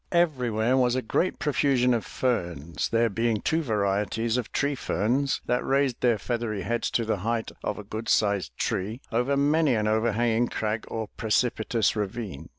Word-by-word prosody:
Everywhere 125 -8 +2
was 125 -1 +3
a 130 - -1
great 180 +10 0
profusion 130 -3 +2
of 115 -3 0
ferns, 85 - -2
there 115 0 +3
being 115 +1 0
two 160 +8 0
varieties 105 -1 0
of 125 -3 -2
tree 145 0 0
ferns 125 +4 0
that 125 - 0
raised 135 -2 +1
their 120 -3 +3
feathery 110 -2 -3
heads 120 +5 -1
to 115 - -2
the 110 -1 0
height 115 +3 -2
of 105 - -2
a 105 - -7
good 110 +2 -6
sized 100 - +1
tree 105 +6 -2
over 125 +4 +1
many 145 -1 +3
an 105 -1 0
overhanging 115 +2 +2
crag 110 0 -2
or 110 -2 -4
precipitous 110 0 +1
ravine. 105 - -4
115 Hz, 165 wpm, -26 LUFS, 105-125 Hz, -, was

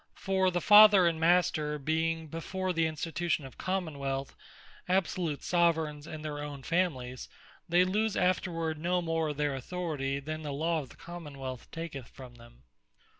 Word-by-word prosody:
For 190 -1 +1
the 175 -1 -1
Father, 210 -2 +8
and 165 -2 +1
Master 160 -3 +2
being 160 +2 -1
before 185 +4 -3
the 165 -1 +2
Institution 160 0 -2
of 130 - -12
Common 180 -6 -2
wealth, 135 0 -3 0.5
absolute 180 -5 0
Soveraigns 160 -4 +1
in 155 -1 -7
their 150 -1 -4
own 145 -2 -6
Families, 130 -8 -1 0.4
they 175 +2 +5
lose 210 +3 0
afterward 165 -3 0
no 175 +2 0
more 165 -1 0
of 145 - -5
their 145 -1 0
Authority, 140 -1 -3
than 155 +3 -5
the 145 -2 -4
Law 160 +3 0
of 135 - -11
the - - -15
Common 165 -5 -9
wealth 130 -2 -7
taketh 165 -6 -6
from 130 -3 -12
them. 115 - -17
160 Hz, 165 wpm, -30 LUFS, 145-175 Hz, 0.5 s, Father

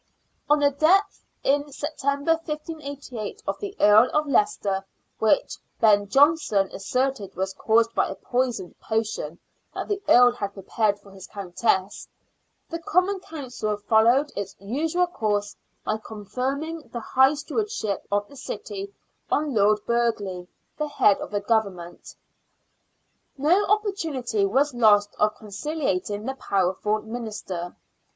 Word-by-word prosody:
On 295 - +6
the 285 -1 +3
death, 345 +8 +2 0.2
in 285 +1 +1
September, 285 +1 -1
1588, 300 -7 -5
of - - -3
the 405 -1 -6
Earl 210 +4 +6
of 300 0 +3
Leicester 275 - +1 0.2
— - - -47
which 220 - +2 0.2
Ben 205 -2 +4
Jonson 270 - +3
asserted 255 0 -2
was 190 +1 -2
caused 230 +2 +2
by - - +1
a 195 - -5
poisoned 245 -7 -2
potion 215 -8 -2 0.4
that - - -4
the 405 -1 -1
earl 245 0 +7
had 200 -4 -5
prepared 205 +1 0
for 200 -1 -18
his 195 -1 -11
countess 195 0 -1 0.3
— - - -47
the 335 - -3
Common 370 +4 +1
Council 250 - -4
followed 235 +7 +3
its 200 -1 -5
usual 310 - 0
course 205 -10 -2 0.3
by 215 0 -1
con 215 -1 -10
ferring 280 +9 -3
the 240 - -4
High 265 +5 +3
Stewardship 295 - -3
of 205 0 +1
the 285 - -15
city 400 - -6 0.4
on 295 -2 0
Lord 210 -1 +3
Burghley, 210 -7 -1 0.3
the 300 - 0
head 210 -8 +4
of - - -6
the 205 -1 -2
Government. 200 -5 -2 1.2
No 340 +9 +3
opportunity 320 - 0
was 270 +7 +2
lost 210 -4 +4
of 210 0 +2
concihating 210 - -3
the 265 - -2
powerful 200 -1 0
minister. 215 -6 -5
235 Hz, 135 wpm, -25 LUFS, 205-295 Hz, 1.2 s, earl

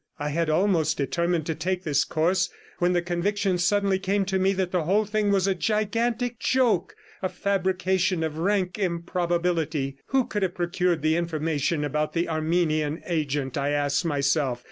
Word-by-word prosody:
I 145 -1 -3
had 165 +2 0
almost 170 -1 +2
determined 170 +3 0
to 160 - -1
take 180 +3 -2
this 145 -3 +2
course, 180 +4 +1 0.3
when 180 +1 +2
the 175 -1 +1
conviction 185 +2 0
suddenly 195 +1 +2
came 195 +1 0
to 190 0 0
me 190 +1 +3
that 185 -2 -1
the 180 -4 0
whole 205 +5 +2
thing 210 0 0
was 195 -2 +2
a 195 - +2
gigantic 225 +5 -1
joke, 245 -9 +1 0.3
a 185 - -1
fabrication 185 -2 0
of 160 0 -3
rank 185 0 0
improbability. 170 -5 -1
Who 265 -2 +2
could 210 - -3
have 185 -2 -1
procured 175 -2 0
the 155 +1 +3
information 160 -2 -1
about 150 +1 -1
the 170 0 0
Armenian 155 -1 0
agent? 145 -6 -1
I 140 +1 0
asked 145 -1 +1
myself. 140 -4 +1
175 Hz, 165 wpm, -25 LUFS, 155-190 Hz, 0.3 s, me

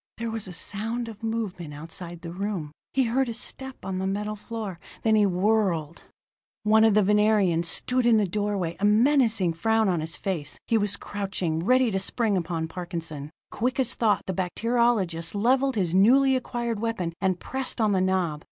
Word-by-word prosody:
There 230 0 -3
was 225 -2 -4
a - - -7
sound 225 +6 -3
of 220 -1 -9
movement 210 -9 -3
outside 170 +3 -8
the 165 - -6
room 185 -5 -3 0.2
he 265 - +2
heard 250 +2 +1
a 230 - -4
step 265 0 -6
on 190 -1 -3
the 190 - -1
metal 210 +2 -2
floor 210 -4 -6 0.2
then 220 - +3
he 210 -2 +5
whirled. 180 -4 0 0.6
One 220 +1 +5
of 220 -2 +5
the 210 - +5
Venerians 205 -4 +3
stood 250 +7 0
in 230 -2 +6
the 210 -2 +2
doorway, 200 -3 -1
a - - -6
menacing 220 - +3
frown 220 +6 +2
on 175 -3 0
his 160 +1 -5
face. 160 -7 -3
He 230 - +2
was 205 -2 +1
crouching, 190 -5 -3
ready 255 +3 +3
to 195 - 0
spring 215 +2 0
upon 170 -2 -2
Parkinson. 165 -4 -6 0.2
Quick 255 +4 -1
as 245 -3 +1
thought, 215 -3 +1
the 190 - -2
bacteriologist 190 -3 0
leveled 260 +5 +2
his 180 -5 0
newly 260 +8 +5
acquired 235 -3 -2
weapon, 215 -7 -2
and 185 -2 +1
pressed 265 -1 -4
on 215 -2 +3
the 190 -2 +2
knob. 185 -5 0
205 Hz, 185 wpm, -26 LUFS, 180-230 Hz, 0.6 s, in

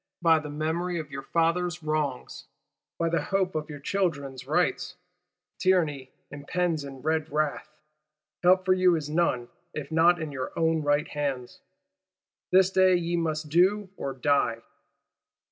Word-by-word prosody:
By 165 -2 +5
the 150 -1 -7
memory 160 +4 -2
of 155 -3 -6
your 135 -1 -5
fathers' 170 +2 0
wrongs, 150 -4 -3 0.5
by 165 - 0
the 170 - 0
hope 190 -2 0
of 155 0 -3
your 145 - -7
children's 140 -7 -2
rights! 180 +3 0 0.6
Tyranny 160 -8 +1 0.2
impends 155 +2 -2
in 135 -2 -10
red 160 0 0
wrath: 150 0 -1 0.7
help 185 +1 +4
for 185 - +4
you 185 -1 +4
is 150 -2 -4
none 150 -7 +1 0.3
if 150 -1 -6
not 170 +2 +4
in 155 -2 -4
your 130 -2 -5
own 160 -1 +2
right 145 +1 +1
hands. 140 -4 -4 0.9
This 190 0 +5
day 185 -1 +4
ye 175 0 -1
must 155 -2 -2
do 190 +5 +3
or 140 - -4
die. 125 -4 +1
160 Hz, 145 wpm, -27 LUFS, 145-180 Hz, 0.9 s, By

